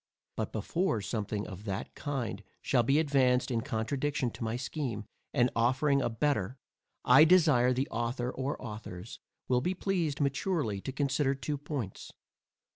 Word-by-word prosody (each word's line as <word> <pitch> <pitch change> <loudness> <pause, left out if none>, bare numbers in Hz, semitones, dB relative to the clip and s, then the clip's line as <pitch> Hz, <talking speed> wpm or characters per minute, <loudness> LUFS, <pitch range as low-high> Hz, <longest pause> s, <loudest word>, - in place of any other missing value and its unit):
But - - -2
before 115 - 0
something 105 -1 -3
of 100 +1 -9
that 100 -2 -4
kind 125 -8 -3 0.2
shall 125 - +3
be 135 +5 +3
advanced 135 -4 +3
in 115 -2 +1
contradiction 130 +4 -1
to - - -7
my 110 +1 -1
scheme, 125 -5 -3 0.3
and 125 -3 +3
offering 135 +4 +3
a - - +1
better, 120 -2 0 0.5
I 130 +5 +8
desire 155 -8 +5
the 130 +2 0
author 120 +2 -1
or 135 +3 -3
authors 105 -4 -8 0.3
will 125 -1 +2
be 180 +7 -1
pleased 175 -7 -1
maturely 140 - 0
to 135 - -4
consider 140 0 +1
two 145 +2 -3
points. 140 -9 -5
130 Hz, 150 wpm, -31 LUFS, 115-145 Hz, 0.5 s, I